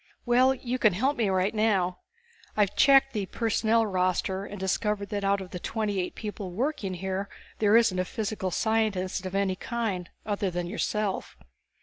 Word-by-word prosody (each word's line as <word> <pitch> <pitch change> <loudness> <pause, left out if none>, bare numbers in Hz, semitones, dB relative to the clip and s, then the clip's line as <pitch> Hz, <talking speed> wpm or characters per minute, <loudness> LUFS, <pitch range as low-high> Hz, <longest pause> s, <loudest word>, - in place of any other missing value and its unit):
"Well, 255 +2 +4
you 255 0 -3
can 215 -5 +4
help 260 +10 +1
me 225 -6 +1
right 190 +2 +1
now. 195 -5 +1 0.6
I 210 - +6
checked 270 +6 +4
the 205 -4 -2
personnel 225 +1 +1
roster 190 0 0
and 205 -1 -8
discovered 200 +1 -1
that 205 -1 -3
out 195 0 +2
of 185 - -9
the 180 - -5
twenty 210 0 -2
eight 180 - -3
people 210 -3 -5
working 210 - -2
here 190 +2 -3 0.3
there 215 +1 +5
isn't 205 -6 +3
a 185 - +1
physical 205 -2 -3
scientist 195 -3 0
of 185 - -6
any 195 -1 +1
kind 205 -5 -3 0.2
other 205 -2 -1
than 175 0 -3
yourself." 190 - -2
205 Hz, 170 wpm, -27 LUFS, 185-225 Hz, 0.6 s, I